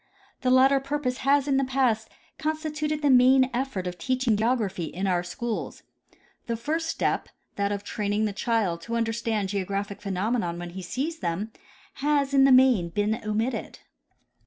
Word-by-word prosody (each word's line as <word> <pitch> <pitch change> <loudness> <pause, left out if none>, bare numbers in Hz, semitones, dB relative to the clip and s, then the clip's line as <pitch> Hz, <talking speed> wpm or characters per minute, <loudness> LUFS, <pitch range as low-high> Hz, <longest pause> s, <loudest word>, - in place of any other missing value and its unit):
The 255 - +1
latter 265 +2 +5
purpose 270 -2 -2
has 280 +1 +2
in 275 -2 +2
the 275 - +2
past 255 -4 +1 0.3
constituted 305 -1 -2
the 285 - +4
main 260 +1 +5
effort 245 -7 -2
of 180 -1 -5
teaching 255 +4 +1
geography 210 -5 0
in 180 +5 -4
our 180 -2 +1
schools. 220 +6 -5 0.6
The 230 -1 -1
first 320 +7 -2
step, - - -1 0.3
that 200 0 0
of 205 0 -3
train 205 0 -3
ing 215 +1 +1
the 210 - -2
child 195 -5 0
to 230 +7 -4
understand 225 -3 -1
geographic 200 +1 -3
phenomena 200 -1 -1
when 175 0 -7
he 190 +2 -7
sees 285 - -3
them, 180 +6 -3 0.5
has 285 -1 +1
in 270 -1 +6
the 275 - +5
main 255 -9 +5
been 210 +5 -1
omitted. 220 +4 -2
230 Hz, 165 wpm, -26 LUFS, 200-270 Hz, 0.6 s, in